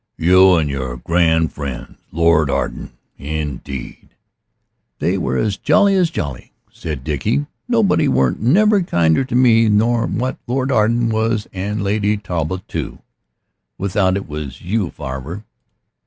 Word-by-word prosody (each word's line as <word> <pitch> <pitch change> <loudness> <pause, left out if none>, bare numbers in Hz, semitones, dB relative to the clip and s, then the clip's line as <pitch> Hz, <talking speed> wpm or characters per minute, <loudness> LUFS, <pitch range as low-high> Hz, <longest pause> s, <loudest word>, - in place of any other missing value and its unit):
"You 90 +2 +5
an' 80 -2 +1
your 65 -3 -4
grand 80 +3 +1
friends. 70 -4 -6 0.2
Lord 85 -2 +3
Arden - - -3 0.3
indeed 70 -3 -6 0.4
" - - -52 0.3
"They 85 +5 0
was 65 - 0
as 100 -2 -2
jolly 200 -1 +3
as 185 -3 +2
jolly," 70 - -6 0.2
said 75 -5 -6
Dickie; 105 - -1 0.2
"nobody 225 -5 +2
weren't 65 -1 +1
never 200 - +4
kinder 85 - +2
to 125 - -4
me 115 -3 +5
nor 115 +3 +2
what 130 +2 -2
Lord 130 +2 -1
Arden 115 0 +2
was 110 -1 0
an' 100 +3 -3
Lady 105 +1 0
Talbot 90 -2 -4
too - - -5 0.8
without 95 0 +1
it 100 - -6
was 75 -4 -7
you, 100 0 -1
farver." 70 +12 -7
95 Hz, 140 wpm, -18 LUFS, 75-115 Hz, 0.8 s, You